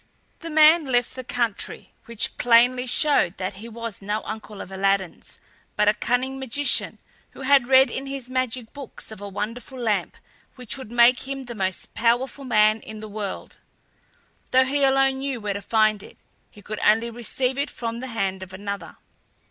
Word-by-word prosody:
The 335 - -7
man 310 0 +6
left 245 -2 +1
the 255 - -6
country, 235 -4 -3
which 235 -3 -2
plainly 245 +2 +4
showed 245 - +2
that 190 +1 -4
he 230 - -8
was 230 -2 -5
no 210 +2 -2
uncle 215 -1 -7
of 190 - -8
Aladdin's 195 -1 -1 0.4
but 210 - +2
a 210 - +6
cunning 255 +4 -1
magician, 265 +2 +1 0.4
who - - -11
had 270 -2 +4
read 265 +1 +6
in 270 +1 -4
his 270 -2 -5
magic 255 -2 -3
books 280 -5 -9
of 215 - -10
a 205 - -6
wonderful 230 +6 -5
lamp, 215 -6 -1 0.4
which 250 -3 -5
would 265 -5 -8
make 240 +2 +4
him 270 -1 -5
the 240 - -7
most 190 -3 -3
powerful 245 +4 0
man 215 -2 +3
in 215 0 -9
the 215 - -7
world. 205 -2 -6 0.9
Though 260 0 +4
he 280 +2 0
alone 270 0 +3
knew 270 -2 -3
where 205 -2 -3
to 200 - -5
find 215 -1 +2
it, - - -14 0.3
he 205 - -17
could 215 +1 -6
only 225 +2 +3
receive 250 +3 -2
it 285 - -1
from 230 -1 -5
the 260 - -6
hand 195 -5 -2
of 190 0 -9
another. 200 -3 -6
235 Hz, 180 wpm, -24 LUFS, 210-260 Hz, 0.9 s, man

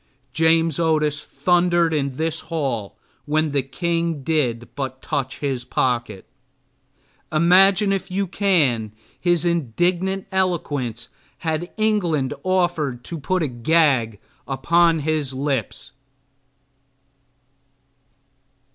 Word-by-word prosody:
James 160 0 +2
Otis 155 -3 +1
thundered 175 -2 +1
in 140 -3 -1
this 160 0 -1
hall 135 - -3 0.3
when 155 +1 0
the 140 -1 +1
king 165 +2 -2
did 125 -6 0
but 130 -2 -5
touch 135 -2 -3
his 135 -4 -2
pocket. 120 -5 -1 1.1
Imagine 185 +5 +5
if 195 0 -3
you 195 +2 -1
can 150 - +1 0.3
his 175 -2 +2
indignant 175 - 0
eloquence 145 - -1 0.4
had 160 +2 -2
England 175 -11 +1
offered 175 -9 0
to 165 +4 -6
put 180 +5 0
a - - 0
gag 125 -4 +2 0.3
upon 165 +4 +2
his 150 -3 -1
lips. 135 -4 -3
155 Hz, 100 wpm, -22 LUFS, 135-175 Hz, 1.1 s, Imagine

